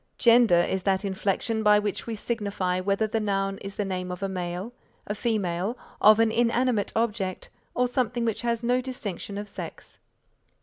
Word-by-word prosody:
Gender 235 -6 +6
is 190 +2 0
that 190 +1 +1
inflection 200 +3 -1
by 210 -1 +6
which 210 +1 -2
we 230 - -3
signify 200 -5 -1
whether 200 +3 +1
the 220 +1 -1
noun 195 -2 -1
is 195 0 -7
the 205 - -1
name 185 -1 -3
of 180 +2 -6
a - - +1
male, 180 +4 -4 0.3
a 205 - -2
female, 205 -1 -1 0.2
of 215 +1 +7
an 225 -1 +4
inanimate 235 -2 +1
object 210 -5 -1 0.2
or 250 0 +2
something 245 -1 -1
which 225 -2 -1
has 235 -1 -1
no 250 +2 +2
distinction 210 -6 -5
of 205 0 -5
sex. 200 - -8
210 Hz, 175 wpm, -26 LUFS, 195-230 Hz, 0.3 s, of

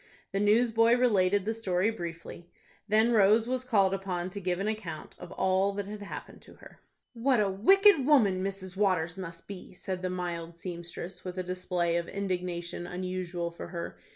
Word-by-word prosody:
The 195 - -1
newsboy 230 +2 +4
related 205 -6 +3
the 220 - 0
story 200 -2 0
briefly. 170 -3 -8 0.4
Then 220 +3 +4
Rose 220 +1 +5
was 255 0 -1
called 200 -6 +3
upon 185 -2 -3
to 200 - -5
give 180 -1 -1
an 200 - -1
account 210 -8 -5
of 175 - -10
all 190 +1 +2
that 200 0 -3
had 205 +1 -7
happened 205 - -8
to - - -15
her. - - -16 0.3
"What 245 +1 +2
a 200 -2 +2
wicked 385 - +5
woman 205 -11 +4
Mrs. 190 -1 -4
Waters 185 -4 +1
must 170 -3 -8
be!" 195 -2 -9
said 185 0 -5
the 185 - -2
mild 170 -2 -4
seamstress, 175 +1 -7
with 180 0 -6
a 185 - -1
display 180 -1 -1
of 170 0 -2
indignation 180 -3 -3
unusual 180 -1 -3
for 170 - -8
her. 170 -1 -6
190 Hz, 180 wpm, -29 LUFS, 180-210 Hz, 0.4 s, Rose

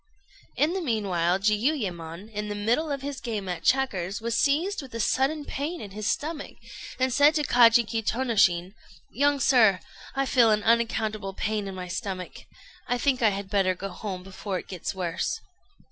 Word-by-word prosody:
In 310 +4 +2
the 380 - -2
meanwhile 190 - +1
Jiuyémon, 205 - -1
in 210 0 -3
the 205 - -4
middle 235 +10 0
of 275 -1 -3
his 280 -1 -5
game 215 -5 -4
at 175 -3 -3
checkers, 205 -8 +1
was 230 0 -2
seized 315 +10 +1
with 260 -4 -11
a - - -3
sudden 280 +6 +1
pain 305 +6 -4
in 200 - -8
his 210 +1 -4
stomach, 305 0 -3 0.4
and 260 -1 +1
said 290 +3 +5
to 300 - +1
Kajiki 235 -3 +4
Tônoshin, 200 -7 +2 0.4
"Young 285 +3 +2
sir, 225 -9 +5 0.4
I 275 0 +1
feel 245 -3 +4
an 215 -1 +2
unaccountable 220 -3 0
pain 210 -1 -2
in 195 - -6
my 180 -1 -6
stomach. 185 -1 -5 0.4
I 245 - +1
think 255 0 +1
I 220 - +5
had 200 -1 -4
better 190 -3 +2
go 195 +2 -5
home, 185 -1 -6
before 195 0 -5
it - - -8
gets 185 +1 -5
worse." 180 -2 -2
220 Hz, 175 wpm, -26 LUFS, 195-265 Hz, 0.4 s, said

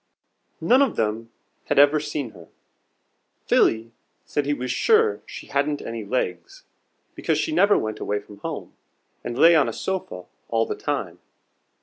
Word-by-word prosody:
None 255 +3 +4
of 275 -4 +2
them 110 +1 -2 0.4
had - - -1
ever 145 +2 +6
seen 145 -5 -4
her. - - -15 1.0
Philly 115 +1 +2 0.3
said 145 -1 -2
he 145 - +2
was 125 -1 -3
sure 440 - +3
she - - -9
hadn't 145 +1 0
any 115 -1 -6
legs, 130 - -3 0.5
because - - -1
she 320 - -1
never 205 -9 +4
went 110 0 -3
away 105 0 -1
from 105 0 -15
home, - - -6 0.5
and 120 0 -5
lay 170 +4 +7
on 150 - +4
a - - -5
sofa 185 - -4 0.2
all 115 -1 +1
the - - -3
time. 105 - -4
140 Hz, 155 wpm, -24 LUFS, 110-165 Hz, 1.0 s, lay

